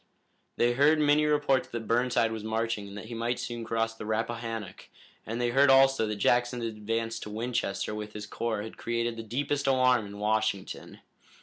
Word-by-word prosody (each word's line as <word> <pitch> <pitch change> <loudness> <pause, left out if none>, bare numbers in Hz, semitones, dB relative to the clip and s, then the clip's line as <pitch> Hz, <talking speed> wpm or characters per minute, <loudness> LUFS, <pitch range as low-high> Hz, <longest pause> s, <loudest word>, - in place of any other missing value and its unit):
They 120 0 +3
heard 145 +5 +4
many 150 0 +3
reports 145 -3 +2
that 115 -2 -6
Burnside 120 -1 +2
was 110 -1 -5
marching 110 -1 -2
and 100 +1 -9
that 105 - -7
he 115 - -8
might 115 +2 -1
soon 120 -1 -5
cross 115 0 -1
the 110 -1 -8
Rappahannock, 115 0 -4 0.4
and 115 +2 -3
they 120 -1 +1
heard 140 +3 +5
also 135 -3 +5
that 105 - -2
Jackson's 120 +3 +1
advance 115 +1 -3
to 105 - -7
Winchester 110 -2 -2
with 105 0 -6
his 105 -1 -6
corps 110 0 -3
had 110 - -9
created 115 0 -2
the 115 - -5
deepest 140 +5 -2
alarm 130 -4 +3
in 100 0 -9
Washington. 105 -2 -2
115 Hz, 185 wpm, -28 LUFS, 110-125 Hz, 0.4 s, heard